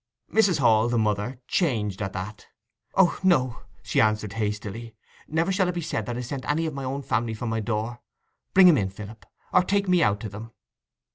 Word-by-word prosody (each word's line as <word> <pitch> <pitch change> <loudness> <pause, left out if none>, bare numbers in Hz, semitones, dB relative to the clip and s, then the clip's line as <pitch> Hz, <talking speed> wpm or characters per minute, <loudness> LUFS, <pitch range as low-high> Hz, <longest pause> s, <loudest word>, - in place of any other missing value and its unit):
Mrs. 200 -6 +4
Hall, 115 -4 +4
the 120 - +1
mother, 105 +3 0
changed 105 - 0
at 95 -2 -3
that. 95 +3 -7 0.5
'O 190 -3 +4
no,' 130 -11 +2 0.2
she - - +2
answered 110 -2 +1
hastily; 110 +1 -4 0.3
'never 165 +4 0
shall 190 -1 +2
it 180 - -3
be 175 - -2
said 110 -9 -3
that 120 -1 -3
I - - -3
sent 130 +2 -5
any 160 +3 +1
of 160 - -3
my 135 -1 -5
own 135 +2 -3
family 115 -2 -1
from 115 +2 -4
my 110 0 -1
door. 110 +2 -3 0.6
Bring 190 -1 +9
'em 160 -7 +6
in, 95 -2 -1
Philip, 105 +3 -11 0.3
or 180 - +6
take 200 +1 0
me 180 -1 +4
out 105 -4 +2
to 110 - -5
them. 110 +3 -9
120 Hz, 205 wpm, -25 LUFS, 105-160 Hz, 0.6 s, Bring